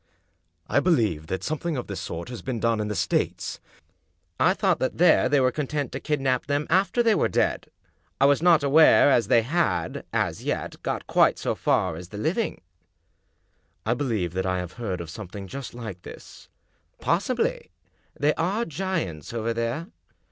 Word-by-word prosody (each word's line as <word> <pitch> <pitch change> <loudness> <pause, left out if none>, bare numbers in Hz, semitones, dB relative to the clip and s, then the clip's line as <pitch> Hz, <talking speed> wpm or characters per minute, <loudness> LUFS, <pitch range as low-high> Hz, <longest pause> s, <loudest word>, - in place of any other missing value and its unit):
" - - -47 0.3
I - - +3
believe 110 - +1
that 95 - -3
something 155 0 -2
of 125 - -3
this 100 - -6
sort 85 +6 -6
has 120 -3 -7
been 130 -4 -3
done 115 0 +1
in 105 - -1
the 105 - -3
States." 90 -1 -1 0.4
" 80 - -46 0.3
I - - +4
thought - - +1
that - - -1
there 130 - +5
they 145 0 +4
were 130 -1 +3
content 145 0 -3
to 130 - -4
kidnap 135 -4 -1
them 145 +1 0
after 195 +6 +3
they 225 -2 +4
were - - +2
dead. - - 0 0.5
I - - +5
was 140 +1 +4
not 170 -3 +5
aware 145 +1 +6
that 105 - -11
they 115 - +5
had, 170 +8 -1
as - - -1
yet, - - -3
got - - -3
quite - - +3
so - - -1
far 90 -4 0
as 90 +1 -9
the 105 - -8
living." 185 - -1 0.6
" - - -44
I 115 - +2
believe 115 - -2
that 95 0 -1
I 90 0 0
have 90 -1 -5
heard 95 -6 -3
of 80 -2 -8
something 100 +1 -8
just 135 +5 -7
like 110 -7 -7
this." - - -12 0.2
" - - -44
Possibly; 255 - 0 0.5
they 150 +1 +3
are 195 +8 -1
giants 160 - -3
over 115 0 -1
there." 115 +7 -2
130 Hz, 190 wpm, -25 LUFS, 100-160 Hz, 0.6 s, aware